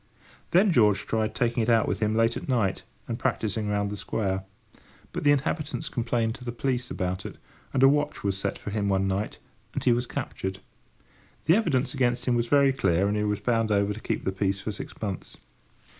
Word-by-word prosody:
Then 190 Hz, +3 st, +5 dB
George 105 Hz, -, +4 dB
tried 110 Hz, -1 st, -1 dB
taking 120 Hz, 0 st, +1 dB
it 110 Hz, -, 0 dB
out 115 Hz, -1 st, +4 dB
with -, -, -1 dB
him 110 Hz, 0 st, +1 dB
late 115 Hz, +1 st, +3 dB
at -, -, -6 dB
night, 110 Hz, -7 st, +1 dB, 0.3 s
and -, -, -3 dB
practising 110 Hz, 0 st, -1 dB
round 100 Hz, 0 st, 0 dB
the -, -, -3 dB
square. 95 Hz, -2 st, -2 dB, 0.7 s
But -, -, -4 dB
the 145 Hz, -, +6 dB
inhabitants 145 Hz, +2 st, -1 dB
complained 115 Hz, -1 st, 0 dB
to 125 Hz, -, -11 dB
the 120 Hz, -, -3 dB
police 125 Hz, +1 st, -2 dB
about 90 Hz, +1 st, -2 dB
it, -, -, -8 dB, 0.3 s
and 135 Hz, -1 st, +2 dB
a -, -, +10 dB
watch 145 Hz, +1 st, +1 dB
was 100 Hz, -1 st, 0 dB
set 100 Hz, 0 st, -2 dB
for 105 Hz, -, -6 dB
him 100 Hz, -1 st, 0 dB
one 95 Hz, 0 st, +2 dB
night, 95 Hz, +2 st, -2 dB, 0.4 s
and -, -, -2 dB
he 125 Hz, -, +4 dB
was 120 Hz, +1 st, -1 dB
captured. 95 Hz, 0 st, -4 dB, 0.9 s
The 165 Hz, -, +6 dB
evidence 140 Hz, -, +1 dB
against 125 Hz, -3 st, +1 dB
him 125 Hz, -, +2 dB
was 120 Hz, 0 st, +1 dB
very 140 Hz, 0 st, +4 dB
clear, 95 Hz, -6 st, +2 dB
and 105 Hz, -, 0 dB
he 105 Hz, -, 0 dB
was 105 Hz, -1 st, -1 dB
bound 115 Hz, -1 st, +1 dB
over 100 Hz, 0 st, +2 dB
to 105 Hz, -, -8 dB
keep -, -, -2 dB
the 95 Hz, -, +1 dB
peace 95 Hz, 0 st, 0 dB
for 110 Hz, -, -4 dB
six -, -, -8 dB
months. 100 Hz, -4 st, -5 dB
110 Hz, 215 wpm, -27 LUFS, 100-125 Hz, 0.9 s, a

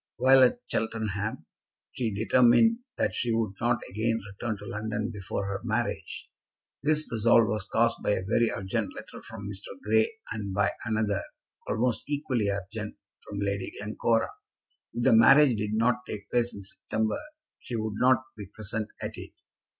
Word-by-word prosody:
While 130 Hz, +1 st, +6 dB
at 130 Hz, -, +4 dB
Cheltenham, 110 Hz, -5 st, -2 dB, 0.5 s
she 115 Hz, -3 st, -2 dB
determined 125 Hz, -, +4 dB, 0.2 s
that -, -, +1 dB
she 115 Hz, 0 st, 0 dB
would 110 Hz, -3 st, 0 dB
not 120 Hz, 0 st, +1 dB
again 115 Hz, +3 st, 0 dB
return 110 Hz, +2 st, -3 dB
to 100 Hz, -, -10 dB
London 110 Hz, +1 st, -3 dB
before 100 Hz, -2 st, -4 dB
her 100 Hz, 0 st, -3 dB
marriage. 120 Hz, +1 st, -2 dB, 0.5 s
This 155 Hz, +1 st, +2 dB
resolve 115 Hz, 0 st, +5 dB
was 105 Hz, -1 st, -2 dB
caused 115 Hz, 0 st, +2 dB
by -, -, -1 dB
a 95 Hz, -, -2 dB
very 115 Hz, +2 st, +3 dB
urgent 95 Hz, 0 st, -2 dB
letter -, -, -9 dB
from 100 Hz, -3 st, -8 dB
Mr. 100 Hz, -1 st, -8 dB
Grey, 110 Hz, +1 st, +3 dB, 0.2 s
and 100 Hz, -3 st, -4 dB
by 100 Hz, 0 st, +3 dB
another, 110 Hz, -3 st, 0 dB, 0.5 s
almost 120 Hz, +1 st, 0 dB
equally 135 Hz, -7 st, 0 dB
urgent, 100 Hz, +2 st, -4 dB, 0.2 s
from 100 Hz, -1 st, -6 dB
Lady 100 Hz, -1 st, -2 dB
Glencora. 110 Hz, +2 st, +1 dB, 0.6 s
If 120 Hz, -, -3 dB
the -, -, +5 dB
marriage 130 Hz, +4 st, +7 dB
did 105 Hz, 0 st, -2 dB
not 115 Hz, +2 st, +3 dB
take 100 Hz, -1 st, -7 dB
place 120 Hz, 0 st, +2 dB
in 100 Hz, -, -8 dB
September 110 Hz, +3 st, -2 dB, 0.4 s
she 120 Hz, -, -6 dB
would 110 Hz, -1 st, -2 dB
not 130 Hz, +2 st, +4 dB
be 105 Hz, -3 st, -8 dB
present 110 Hz, +1 st, -4 dB
at -, -, -2 dB
it. -, -, -10 dB
110 Hz, 160 wpm, -28 LUFS, 105-120 Hz, 0.6 s, marriage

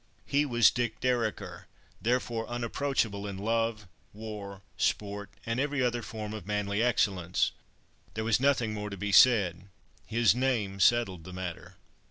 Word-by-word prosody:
He 145 Hz, +1 st, +1 dB
was 120 Hz, -4 st, +5 dB
"Dick 120 Hz, -2 st, -2 dB
Dereker," 120 Hz, -4 st, -2 dB, 0.4 s
therefore 120 Hz, -1 st, -1 dB
unapproachable 120 Hz, -3 st, -1 dB
in 100 Hz, -1 st, -5 dB
love, 115 Hz, 0 st, -1 dB, 0.3 s
war, 100 Hz, -2 st, -8 dB
sport, 100 Hz, 0 st, -1 dB, 0.2 s
and 115 Hz, +2 st, -1 dB
every 145 Hz, -1 st, 0 dB
other 120 Hz, -1 st, 0 dB
form 110 Hz, -2 st, -6 dB
of 105 Hz, -4 st, -7 dB
manly 105 Hz, 0 st, -1 dB
excellence. 95 Hz, -7 st, +1 dB, 0.6 s
There 110 Hz, -, -2 dB
was 115 Hz, 0 st, +2 dB
nothing 130 Hz, -5 st, +2 dB
more 105 Hz, -1 st, -4 dB
to 100 Hz, -, -7 dB
be 105 Hz, +2 st, -3 dB
said. 100 Hz, -6 st, +5 dB, 0.4 s
His 115 Hz, -1 st, +3 dB
name 115 Hz, -6 st, -1 dB
settled 95 Hz, -4 st, +3 dB
the 90 Hz, -, -10 dB
matter. 90 Hz, -2 st, -6 dB
110 Hz, 145 wpm, -29 LUFS, 100-120 Hz, 0.6 s, was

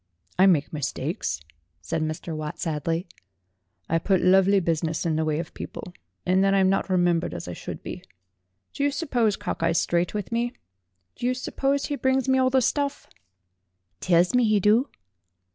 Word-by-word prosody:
"I 190 Hz, -, +7 dB
make 160 Hz, -6 st, +2 dB
mistakes," 145 Hz, -, -3 dB, 0.4 s
said 160 Hz, -, -3 dB
Mr. 155 Hz, +1 st, -3 dB
Watt 155 Hz, -1 st, -5 dB
sadly. 165 Hz, +2 st, -2 dB, 0.8 s
"I 165 Hz, -, +1 dB
put 190 Hz, +2 st, +2 dB
lovely 195 Hz, +2 st, +5 dB
business 165 Hz, -1 st, -1 dB
in 160 Hz, -2 st, +1 dB
the 160 Hz, -, +1 dB
way 155 Hz, -1 st, 0 dB
of 165 Hz, +1 st, -5 dB
people, 180 Hz, -, -8 dB, 0.3 s
and 185 Hz, +1 st, +3 dB
then 195 Hz, 0 st, +3 dB
I'm 190 Hz, -1 st, +4 dB
not 195 Hz, -, 0 dB
remembered 175 Hz, -2 st, +1 dB
as -, -, -6 dB
I 90 Hz, -, -5 dB
should -, -, -7 dB
be. -, -, -6 dB, 0.7 s
Do 280 Hz, -, -2 dB
you 285 Hz, -, +3 dB
suppose 250 Hz, -8 st, 0 dB
Cock -, -, -5 dB
eye's 165 Hz, 0 st, +2 dB
straight 175 Hz, +3 st, 0 dB
with 210 Hz, 0 st, -4 dB
me? 240 Hz, +1 st, -1 dB, 0.6 s
Do 245 Hz, -, -2 dB
you 255 Hz, -, +1 dB
suppose 275 Hz, +2 st, -1 dB
he 290 Hz, -, -2 dB
brings 260 Hz, -1 st, +1 dB
me 265 Hz, 0 st, +3 dB
all 255 Hz, 0 st, +3 dB
the 260 Hz, -1 st, +3 dB
stuff?" 285 Hz, +3 st, -1 dB, 0.9 s
"Tells 175 Hz, +2 st, +3 dB
me 250 Hz, 0 st, +4 dB
'e 215 Hz, -2 st, +3 dB
do." 215 Hz, +7 st, +3 dB
190 Hz, 180 wpm, -25 LUFS, 165-245 Hz, 0.9 s, I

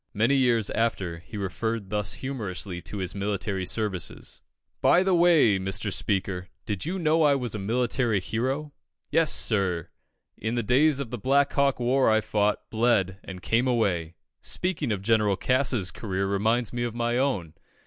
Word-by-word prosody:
Many 115 Hz, +6 st, +3 dB
years 120 Hz, -6 st, +2 dB
after, 95 Hz, -7 st, -1 dB
he 105 Hz, +6 st, -10 dB
referred 105 Hz, +2 st, -3 dB
thus 105 Hz, -2 st, -1 dB
humorously 100 Hz, -8 st, -5 dB
to 85 Hz, +5 st, -7 dB
his 95 Hz, -3 st, -2 dB
military 100 Hz, -2 st, -2 dB
services: 105 Hz, -5 st, -4 dB, 0.4 s
"By 180 Hz, -, +5 dB
the 190 Hz, -1 st, +2 dB
way, 165 Hz, -, +5 dB
Mr. 95 Hz, +1 st, -2 dB
Speaker, 95 Hz, -3 st, -1 dB, 0.2 s
did 105 Hz, +4 st, -4 dB
you 185 Hz, +3 st, -2 dB
know 165 Hz, -2 st, +2 dB
I 145 Hz, -2 st, +5 dB
was 125 Hz, -5 st, -3 dB
a 105 Hz, -, -3 dB
military 115 Hz, +1 st, 0 dB
hero? 130 Hz, +10 st, -3 dB, 0.4 s
Yes, 165 Hz, -1 st, +3 dB
sir, 95 Hz, -6 st, 0 dB, 0.5 s
in 110 Hz, +3 st, -3 dB
the 120 Hz, -, 0 dB
days 135 Hz, +6 st, +3 dB
of 130 Hz, -5 st, -5 dB
the 125 Hz, -, -4 dB
Black 140 Hz, +5 st, +2 dB
Hawk 140 Hz, -2 st, +2 dB
war 130 Hz, +2 st, +3 dB
I 110 Hz, 0 st, +4 dB
fought, 105 Hz, -1 st, 0 dB
bled, 105 Hz, -5 st, +1 dB
and 95 Hz, -1 st, -9 dB
came 120 Hz, +3 st, +1 dB
away. 90 Hz, -9 st, 0 dB, 0.3 s
Speaking 175 Hz, -8 st, -1 dB
of 100 Hz, -2 st, -2 dB
General 105 Hz, -2 st, +2 dB
Cass's 125 Hz, -6 st, +1 dB
career 95 Hz, -3 st, -3 dB
reminds 110 Hz, +4 st, +1 dB
me 120 Hz, -, -2 dB
of 120 Hz, -1 st, -2 dB
my 120 Hz, +1 st, 0 dB
own. 100 Hz, -, -1 dB
110 Hz, 170 wpm, -26 LUFS, 95-130 Hz, 0.5 s, By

